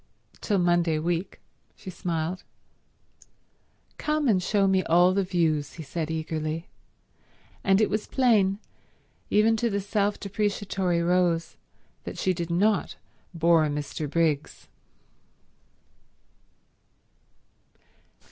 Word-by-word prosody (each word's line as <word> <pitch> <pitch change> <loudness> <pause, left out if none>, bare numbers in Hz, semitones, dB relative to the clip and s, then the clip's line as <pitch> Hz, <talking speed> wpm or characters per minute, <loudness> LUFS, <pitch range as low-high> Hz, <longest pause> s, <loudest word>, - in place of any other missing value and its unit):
"Till 205 - 0
Monday 175 -3 +2
week," 175 +4 -2 0.4
she 185 - -9
smiled. 170 0 -3 1.6
"Come 300 -1 0
and 195 -6 +3
show 200 +2 +1
me 190 -1 +3
all 175 +2 +4
the 200 - +2
views," 165 -6 0
he 165 - -8
said 155 +2 -4
eagerly; 160 0 -3 1.0
and 195 0 +4
it 215 - +3
was 210 +2 -2
plain, 215 -7 +3 0.7
even 220 +2 +4
to 235 +1 0
the 200 -1 -1
self 205 +1 -1
depreciatory 195 -3 -1
Rose, 175 -1 +1 0.5
that - - -7
she 185 - +1
did 170 -1 -4
not 200 +5 +1 0.4
bore 165 -1 +4
Mr. 150 0 -4
Briggs. 155 -2 -1
180 Hz, 105 wpm, -26 LUFS, 165-200 Hz, 1.6 s, all